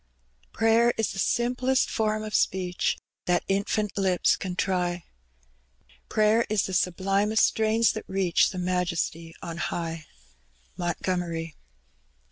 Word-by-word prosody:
Prayer 225 +1 +3
is 225 - 0
the 195 - -6
simplest 250 +5 +1
form 215 -1 -1
of 215 0 -6
speech 180 -1 0 0.3
That 175 -1 +1
infant 200 +1 0
lips 190 -3 +2
can 185 -2 -5
try; 180 -2 -1 1.1
Prayer 215 +2 +3
the 215 - -1
sublimest 195 +3 +2
strains 220 +1 +2
that 220 - -7
reach 190 -3 +2
The 190 - -7
Majesty 175 -2 -2
on 165 -1 -6
high 165 -2 -4 0.7
MONTOOMERT. 175 -2 -2
190 Hz, 110 wpm, -26 LUFS, 175-215 Hz, 1.1 s, Prayer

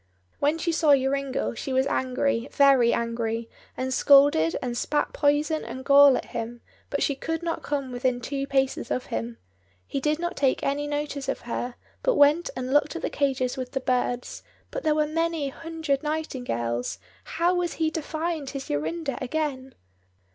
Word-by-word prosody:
When 295 +3 +2
she 335 +1 -1
saw 315 -3 +5
Joringel 270 0 -1
she 265 - -5
was 260 0 +2
angry, 255 -2 0
very 270 -4 +5
angry, 230 -1 -2 0.3
and 260 0 -2
scolded 275 - +5
and 245 -2 -3
spat 295 +4 -1
poison 295 +2 +1
and 260 +1 -7
gall 280 -1 +7
at - - -5
him, 235 +1 -5 0.3
but 285 - 0
she 280 - +1
could 325 +4 -4
not 335 -1 -2
come 280 -3 -3
within 245 0 0
two 275 +2 -3
paces 270 -1 0
of 250 - -1
him. 115 +1 -3 0.5
He 275 - -3
did 300 +2 +1
not 345 +2 -3
take 270 -2 +1
any 285 +1 -1
notice 290 -1 -3
of - - -2
her, 240 +1 -4 0.3
but - - +2
went 300 +3 +4
and 255 +1 -3
looked 290 +1 +3
at 335 - -5
the - - -1
cages 265 -3 0
with 255 -1 -5
the 270 - 0
birds; 250 -1 -1 0.3
but - - -3
there 310 -2 +2
were 305 0 +2
many 325 -1 -1
hundred 315 -2 -3
nightingales, 245 - -2 0.3
how 345 +2 +1
was 355 -1 -1
he 320 -1 0
to 320 - -3
find 315 -2 -3
his 275 -1 -6
Jorinda 275 - -2
again? 265 -1 -3
275 Hz, 175 wpm, -26 LUFS, 255-305 Hz, 0.5 s, gall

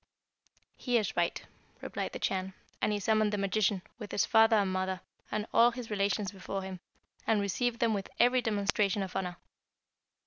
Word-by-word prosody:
"'He 245 -2 +1
is 215 -5 -1
right,' 170 -1 0 0.4
replied - - -4
the - - -3
Chan, 190 0 -2 0.3
and - - +2
he 205 - 0
summoned 215 +1 +2
the 210 - -1
magician, 195 -1 +1 0.2
with 210 -3 -7
his 205 - +2
father 225 0 +5
and 200 -3 +2
mother, 185 0 -1 0.3
and 210 0 -1
all 235 +1 +7
his 240 -2 -7
relations 200 -1 0
before 195 0 -5
him, 190 -1 -6 0.5
and 220 -2 +3
received 230 +4 0
them 230 -2 +2
with 200 -2 -3
every 250 +1 +5
demonstration 205 -2 +1
of 185 - -7
honour. 180 -2 -2
205 Hz, 175 wpm, -31 LUFS, 190-220 Hz, 0.5 s, all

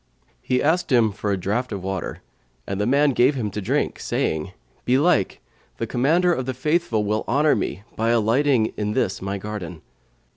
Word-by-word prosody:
He 125 - 0
asked 160 +2 +1
him 115 -4 +4
for 105 0 -3
a 100 - +1
draught 105 +8 -2
of 100 -3 -5
water, 95 -2 -4 0.4
and 100 +1 -3
the 105 - 0
man 140 +3 +4
gave 130 +3 +3
him 110 -6 -2
to 105 - -4
drink, 95 - -1
saying, 80 +3 -2 0.3
"Belike, 130 - +2 0.4
the 115 - -2
Commander 160 +10 +2
of 130 -5 -3
the 130 - -2
Faithful 150 -5 0
will 105 +1 -1
honour 145 +5 +3
me 100 - -3
by 115 +1 0
alighting 115 +1 +2
in 105 0 -1
this 105 -6 -1
my 100 +1 -3
garden." 95 -5 -7
115 Hz, 180 wpm, -23 LUFS, 100-135 Hz, 0.4 s, him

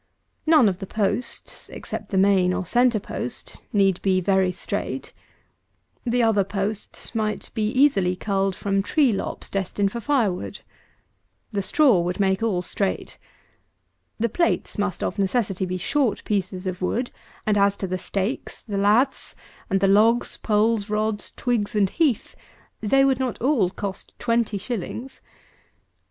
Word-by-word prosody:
None 310 -8 +6
of 185 -2 0
the 195 - -6
posts, 215 +4 -2
except - - -6
the 195 - -1
main 190 -2 +4
or 185 - -2
centre 240 +3 +3
post, - - -5
need 195 -4 +2
be 190 -1 +2
very 190 0 +2
straight. - - -4 0.9
The 240 0 +2
other 215 -3 +3
posts 200 +3 -4
might 215 -2 -2
be 215 -2 0
easily 215 -8 +3
culled 195 0 0
from 195 0 0
tree 275 +5 +3
lops, 195 - -4
destined 195 +1 -1
for 235 - -4
fire 235 -6 +2
wood. 180 - -7 0.9
The 200 -2 -1
straw 250 - +4
would 180 +3 -2
make 190 0 +2
all 200 -6 0
straight. 195 +2 -2 1.0
The 235 - +2
plates 335 -3 0
must 205 -4 -1
of - - -2
necessity 195 -2 0
be 185 0 -2
short 245 +3 0
pieces 195 -2 -2
of 185 0 -4
wood; 240 +7 -1 0.3
and, 215 - +2
as 200 0 +3
to 195 - -3
the 185 0 -3
stakes, 200 +7 -3
the 205 -3 -3
laths, 225 +7 +2 0.3
and 195 -2 +1
the 195 - +4
logs, 220 +5 +4
poles, 215 0 +1
rods, 215 0 -1
twigs, 230 -4 -1
and 200 -2 +2
heath, 300 -10 0 0.5
they 270 +6 +4
would 265 -1 +2
not 255 -3 -2
all 245 -8 +2
cost 195 0 -6
twenty 230 -3 0
shillings. 240 +4 -5
205 Hz, 150 wpm, -24 LUFS, 195-235 Hz, 1.0 s, None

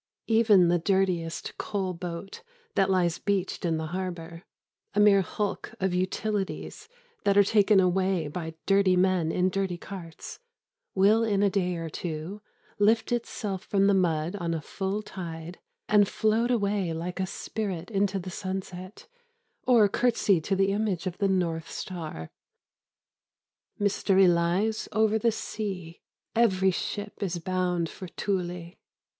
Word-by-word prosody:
Even 220 -5 +5
the 175 0 +3
dirtiest 180 -2 0
coal 190 -3 -2
boat 175 - -7 0.3
that 195 -1 +2
lies 175 -3 +2
beached 195 -2 -1
in 165 -2 +1
the 160 - -3
harbour, 170 -3 -5 0.5
a - - +3
mere 205 -1 +6
hulk 205 +4 -3
of 190 -2 0
utilities 200 - -2 0.3
that 200 0 +3
are 205 - +8
taken 205 0 +4
away 185 -2 +2
by 160 +1 -5
dirty 195 -2 +4
men 180 -3 +2
in 185 +2 +1
dirty 190 -2 -1
carts, 170 -3 -9 0.6
will 205 +4 +5
in 205 -3 +1
a 200 - +3
day 180 -2 0
or 165 -1 -4
two 165 +5 -5 0.4
lift 220 +3 +3
itself 210 -5 -3
from 195 -2 +2
the 200 - +4
mud 170 -1 +1
on 170 -3 -2
a - - -2
full 195 +6 -3
tide 170 -2 -7 0.3
and 205 -1 +4
float 220 +3 +1
away 200 -6 +1
like 175 +3 -4
a 190 - 0
spirit 190 -2 -4
into 200 -1 +1
the 185 0 -5
sunset 185 0 -6 0.6
or 235 -5 +6
curtsy 205 -5 +2
to 195 +5 0
the 195 +1 +2
image 200 -3 -1
of 185 -1 -4
the 200 - +2
North 170 -4 0
Star. 155 - -6 1.5
Mystery 195 -1 +3
lies 175 +6 +1
over 220 +1 +2
the 230 +1 +3
sea. 190 -6 -5 0.3
Every 190 -5 +3
ship 205 +3 -4
is 185 -3 -1
bound 180 -1 -1
for 185 - -9
Thule. 180 -3 -3
190 Hz, 145 wpm, -27 LUFS, 175-205 Hz, 1.5 s, are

